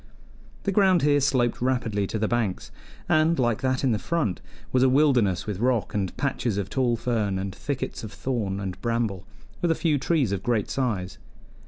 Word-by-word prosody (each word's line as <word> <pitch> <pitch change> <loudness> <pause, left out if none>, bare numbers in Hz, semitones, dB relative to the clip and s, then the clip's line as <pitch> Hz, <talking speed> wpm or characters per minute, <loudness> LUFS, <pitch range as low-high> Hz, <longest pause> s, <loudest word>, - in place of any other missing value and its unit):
The 200 - 0
ground 190 -4 +4
here 145 0 +4
sloped 130 -4 +1
rapidly 115 -6 0
to 110 - -3
the 110 0 0
banks, 110 -6 -1 0.4
and, 155 +2 +3
like 120 -4 +1
that 130 0 0
in 130 - +3
the 110 - 0
front, 150 - -1 0.3
was 130 - +3
a 130 - +5
wilderness 125 - +3
with 105 -3 -4
rock 120 -2 +1
and 95 -3 -2
patches 125 -6 -1
of 100 -2 -3
tall 125 -3 +1
fern 110 -5 -1
and 95 0 -3
thickets 140 -1 -4
of 110 - -6
thorn 105 -2 -2
and 95 -2 -5
bramble, 115 -6 -1 0.3
with 175 - +1
a 165 - +3
few 155 -4 +1
trees 140 - +1
of 100 -2 -1
great 110 -2 0
size. 105 -9 -2
120 Hz, 190 wpm, -25 LUFS, 100-135 Hz, 0.4 s, a